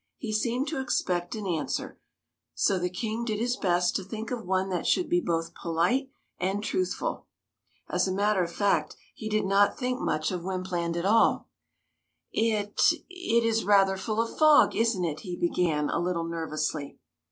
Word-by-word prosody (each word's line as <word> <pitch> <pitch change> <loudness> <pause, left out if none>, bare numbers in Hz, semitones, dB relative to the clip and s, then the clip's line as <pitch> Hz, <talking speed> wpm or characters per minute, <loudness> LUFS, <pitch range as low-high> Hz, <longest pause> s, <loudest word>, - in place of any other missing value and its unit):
He 220 -5 -4
seemed 240 +5 0
to 305 -3 -3
expect 180 -8 -1
an 215 -2 -5
answer, 165 -5 -3 0.6
so 195 -2 +2
the 180 0 -1
King 220 +5 -3
did 220 -3 -2
his 240 +3 0
best 180 -6 +1
to 195 - -1
think 220 +5 -6
of 245 -2 -3
one 190 +1 +1
that 180 -2 -2
should 365 - +2
be 350 +1 +2
both 165 - -2
polite 175 +12 0 0.3
and 195 +3 -1
truthful. 370 +12 -2 0.6
As - - +1
a - - -1
matter 200 0 +2
of 170 - -4
fact, 200 +3 +1 0.2
he 215 -6 -6
did 215 -1 +1
not 200 +1 +3
think 250 -1 -2
much 155 +3 -1
of 180 -2 -3
Wympland 180 -2 -2
at 170 - -2
all. 220 +3 +3 0.8
"It 215 -2 0 0.2
— - - -33
it 360 -11 +1
is 225 0 +1
rather 195 -1 +4
full 215 +3 -3
of 230 0 -1
fog, 310 -1 +6
isn't 225 -6 +1
it?'' 155 -2 -3
he 180 -3 -6
began, 170 -4 0
a - - 0
little 175 -1 -1
nervously. 155 -3 -3
195 Hz, 180 wpm, -27 LUFS, 175-230 Hz, 0.8 s, fog